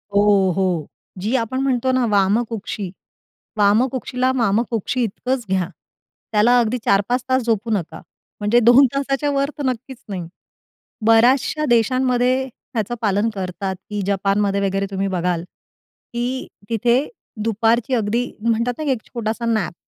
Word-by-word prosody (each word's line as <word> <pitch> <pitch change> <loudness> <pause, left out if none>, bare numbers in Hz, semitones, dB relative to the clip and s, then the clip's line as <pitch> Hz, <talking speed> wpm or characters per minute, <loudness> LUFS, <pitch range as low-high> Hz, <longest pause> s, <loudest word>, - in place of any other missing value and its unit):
हो, 200 -2 +4
हो. 180 -5 0 0.3
जी 220 +7 0
आपण 255 +1 -1
म्हणतो 260 -1 +1
ना 255 -1 +2
वामकुक्षी 205 -1 0 0.7
वामकुक्षीला, 250 +4 +2
वामकुक्षी 230 +2 0
इतकंच 245 +3 -2
घ्या. 185 -2 0 0.6
त्याला 230 +4 +4
अगदी 240 +1 +1
4-5 205 +6 +2
तास 260 0 +2
झोपू 230 -1 -1
नका 195 -7 -2 0.4
म्हणजे 210 +4 +3
2 240 +4 +7
तासाच्या 275 +1 0
वर 280 0 0
तर 290 - -3
नक्कीच 255 +1 -3
नाही. 185 -4 -4 0.8
बऱ्याचशा 250 +6 +4
देशांमध्ये 255 +2 +2
त्याचं 235 -2 -5
पालन 205 +1 +2
करतात 190 0 -4
की 205 -1 -2
जपानमध्ये 200 0 +1
वगैरे 195 0 0
तुम्ही 195 0 -1
बघाल 180 -2 -1 0.7
की 245 +2 -2 0.2
तिथे 240 +5 +2 0.4
दुपारची 225 +3 +1
अगदी 230 +2 0
म्हणतात 230 +2 +1
ना 310 - -3
की 290 - 0
एक 250 -4 -1
छोटासा 230 -1 -3
नॅप 215 -6 0
230 Hz, 135 wpm, -20 LUFS, 200-250 Hz, 0.8 s, 2